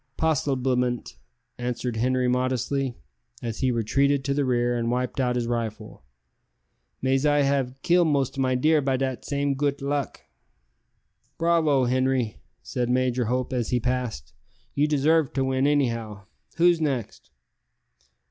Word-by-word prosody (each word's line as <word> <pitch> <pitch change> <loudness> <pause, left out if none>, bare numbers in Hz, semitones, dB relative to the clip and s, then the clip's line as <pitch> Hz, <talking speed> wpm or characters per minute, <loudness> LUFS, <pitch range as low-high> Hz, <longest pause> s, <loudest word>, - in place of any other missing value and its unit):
"Possiblement," 130 -5 0 0.4
answered 125 -1 -3
Henri 125 +2 +1
modestly, 130 +1 0 0.5
as 115 -2 -4
he 130 - +2
retreated 135 +4 +1
to 140 - +1
the 145 0 +1
rear 120 -1 +1
and 115 -1 -1
wiped 125 +2 -2
out 125 -2 +1
his 120 -1 0
rifle; 115 - -4 1.0
"mais 135 +1 +2
I 145 -1 +3
have 135 -2 0
kill 175 0 +4
most 140 -5 0
of 135 - -2
my 130 -1 +1
deer 155 +4 +3
by 135 -1 0
dat 130 -1 -2
same 140 0 -1
goot 140 +1 -1
luck." 140 0 -3 1.2
"Bravo, 165 -5 +3
Henri!" 130 - 0 0.3
said 120 -1 -2
Major 125 -1 +1
Hope 125 +3 -1
as 120 -3 -1
he 125 - +1
passed; 125 - -3 0.4
"you 145 +1 +2
deserve 150 0 +2
to 135 -1 0
win, 130 +1 +1
anyhow. 115 -8 -1 0.3
Who's 170 -1 +4
next?" 135 - -3
130 Hz, 140 wpm, -25 LUFS, 125-140 Hz, 1.2 s, kill